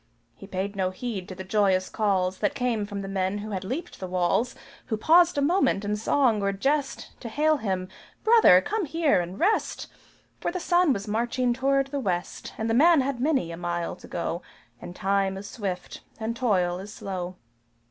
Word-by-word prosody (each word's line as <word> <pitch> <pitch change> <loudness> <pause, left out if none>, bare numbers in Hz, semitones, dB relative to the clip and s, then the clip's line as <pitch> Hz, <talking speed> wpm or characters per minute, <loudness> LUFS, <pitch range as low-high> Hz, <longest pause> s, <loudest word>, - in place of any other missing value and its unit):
He 195 - -12
paid 195 +1 -3
no 190 -2 0
heed 190 -1 -5
to 185 - -7
the 190 - -7
joyous 190 -1 +2
calls 190 -4 0
That 205 - 0
came 230 -5 -1
from 200 -1 -5
men 190 +1 0
who 210 +1 -6
had 190 -2 -3
leaped 275 - -5
the 185 - -5
walls 185 +7 0 0.3
Who 220 - -1
paused 340 +7 +5
a 285 - +2
moment 290 - +2
in 210 +1 0
song 225 0 +2
or 200 0 +1
jest, 275 +8 -1
To 235 - -7
hail 305 +5 +2
him 190 -6 -2 0.4
"Brother, 440 - +7
come 425 - -2
here 315 - +2
and 175 +3 -7
rest!" 420 +5 +1 0.5
For - - -2
the 365 - -3
Sun 350 -2 +3
was 200 -4 -2
marching 240 +3 0
toward 275 +2 +2
the 285 - -1
West, 180 -8 -3
And 220 - -2
the 225 - +1
man 315 +4 +6
had 265 -1 -2
many 270 - +1
a 165 - -6
mile 175 -1 -3
to - - -13
go, 170 0 -3 0.4
And 175 0 -8
time 195 0 0
is 200 +1 -7
swift 190 -6 -5 0.2
and 225 +1 -2
toil 185 -7 +1
is 200 +2 -8
slow. 185 -3 -5
210 Hz, 195 wpm, -26 LUFS, 185-270 Hz, 0.5 s, Brother